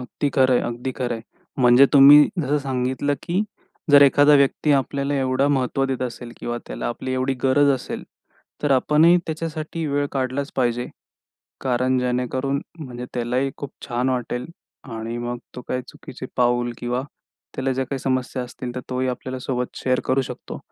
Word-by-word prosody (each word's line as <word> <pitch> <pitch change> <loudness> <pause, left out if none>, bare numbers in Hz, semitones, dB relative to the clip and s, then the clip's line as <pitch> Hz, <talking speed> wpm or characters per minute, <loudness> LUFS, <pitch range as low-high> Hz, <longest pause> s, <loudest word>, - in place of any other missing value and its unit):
अगदी 125 +3 -3
खरं 130 -1 +3
आहे. - - +3
अगदी 120 +2 -4
खरं 125 -2 -2
आहे. 115 - -7 0.4
म्हणजे 125 +3 +7
तुम्ही 145 +1 +9
जसं 150 -2 +1
सांगितलं, 130 +1 -1
की 180 +4 0 0.5
जर 145 0 +9
एखादा 145 +1 +6
व्यक्ती 140 +2 +3
आपल्याला 140 +1 0
एवढं 135 +1 +1
महत्त्व 135 0 0
देत 130 -1 -2
असेल 120 -1 -6
किंवा 120 0 -4
त्याला - - -5
आपली 130 +2 -4
एवढी 130 +1 0
गरज 140 +2 +4
असेल. 130 -2 -3 0.6
तर 145 - +1
आपणही 150 +6 +5
त्याच्यासाठी 160 0 -4
वेळ 145 0 0
काढलाचं 135 +1 -2
पाहिजे. 120 -1 0 0.7
कारण 130 0 +1
जेणेकरून 125 +2 -1 0.2
म्हणजे 125 -5 -7
त्यालाही 125 +3 0
खूप 140 -1 -6 0.2
छान 125 0 -1
वाटेल 125 -1 -2 0.5
आणि 115 +1 -4
मग 120 0 -3 0.2
तो 125 - -6
काही 125 0 -1
चुकीचे 130 - -9
पाऊल 120 -1 +2
किंवा 125 +1 -2 0.5
त्याला 135 0 -1
ज्या 130 +1 -1
काही 135 - -3
समस्या 130 0 -1
असतील 125 0 -7
तर 125 - -3
तोही 130 0 -1
आपल्याला 130 +1 -4
सोबत 125 -1 -2
शेअर 130 -1 0
करू 130 +1 +2
शकतो. - - -8
130 Hz, 165 wpm, -22 LUFS, 125-140 Hz, 0.7 s, तुम्ही